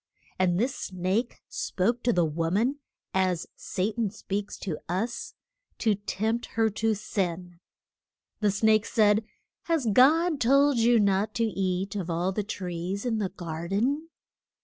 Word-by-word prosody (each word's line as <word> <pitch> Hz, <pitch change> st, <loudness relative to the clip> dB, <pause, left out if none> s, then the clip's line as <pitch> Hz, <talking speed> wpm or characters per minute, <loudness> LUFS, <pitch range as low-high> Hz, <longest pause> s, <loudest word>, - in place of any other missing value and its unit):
And 180 Hz, -1 st, +2 dB
this 250 Hz, +4 st, +1 dB
snake 190 Hz, +3 st, -2 dB
spoke 245 Hz, -, -1 dB
to 240 Hz, -, +2 dB
the 175 Hz, -6 st, +3 dB
wo 165 Hz, +1 st, -1 dB
man 240 Hz, -, +1 dB, 0.3 s
as 185 Hz, -2 st, +1 dB
Sa 195 Hz, +3 st, -2 dB
tan 225 Hz, -2 st, -1 dB
speaks 200 Hz, 0 st, -4 dB
to 170 Hz, -6 st, -4 dB
us 220 Hz, +7 st, -3 dB, 0.4 s
to 220 Hz, -2 st, +2 dB
tempt 220 Hz, +3 st, -2 dB
her 225 Hz, -1 st, +3 dB
to 220 Hz, +1 st, 0 dB
sin. 180 Hz, -4 st, -3 dB, 0.8 s
The 210 Hz, -, +2 dB
snake 215 Hz, +1 st, +3 dB
said: 210 Hz, 0 st, +3 dB, 0.4 s
Has 325 Hz, -6 st, +1 dB
God 310 Hz, -, +5 dB
told 275 Hz, +1 st, +4 dB
you 235 Hz, 0 st, +5 dB
not 200 Hz, +1 st, +1 dB
to 230 Hz, -, +1 dB
eat 195 Hz, -2 st, -1 dB
of 185 Hz, -4 st, -3 dB
all 175 Hz, +3 st, 0 dB
the 210 Hz, -, -1 dB
trees 185 Hz, 0 st, -4 dB
in 225 Hz, -3 st, 0 dB
the 200 Hz, -3 st, -1 dB
gar 170 Hz, -3 st, -6 dB
den? 270 Hz, -, 0 dB
205 Hz, 150 wpm, -27 LUFS, 185-235 Hz, 0.8 s, God